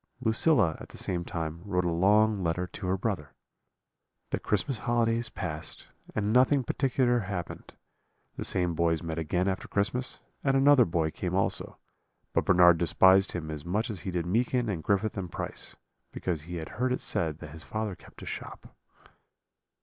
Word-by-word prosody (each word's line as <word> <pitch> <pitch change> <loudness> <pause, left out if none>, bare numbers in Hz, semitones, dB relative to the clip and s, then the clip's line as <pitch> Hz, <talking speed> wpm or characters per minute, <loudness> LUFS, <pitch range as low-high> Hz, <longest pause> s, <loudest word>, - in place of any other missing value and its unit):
Lucilla 110 - +3
at - - -10
the - - -11
same 85 -1 -1
time 80 -1 -4
wrote 90 -3 0
a 85 - +1
long 105 +4 +3
letter 85 +2 0
to 90 +2 -7
her 95 +1 +1
brother. 95 -8 -3 1.0
"The - - 0
Christmas 110 +4 -1
holidays 120 -1 +1
passed, 80 +1 -6 0.3
and 105 0 0
nothing 130 +2 +4
particular 125 -1 +1
happened; 95 -4 -6 0.6
the - - -4
same 90 -2 0
boys 80 0 +1
met 80 -1 -3
again 90 +4 0
after 95 -1 -2
Christmas, 125 +5 -1 0.2
and 135 -1 +3
another 135 -2 +6
boy 80 -2 0
came - - -3
also; - - -1 0.6
but - - +1
Bernard 90 -2 +6
despised 95 +3 +5
him 80 -3 -4
as 75 -2 -6
much 105 +8 -1
as 100 - -5
he 95 - -5
did 85 -2 -2
Meekin 120 +5 +1
and 90 -6 -2
Griffith 100 +6 0
and 90 -3 -5
Price, - - -5 0.4
because 85 -5 -3
he 90 - -4
had 80 -2 -5
heard 125 +2 -1
it 125 - -1
said 80 -3 -1
that 75 -2 -10
his 80 +2 -8
father 110 +2 -3
kept - - -15
a - - -7
shop. - - -8
95 Hz, 175 wpm, -29 LUFS, 85-115 Hz, 1.0 s, another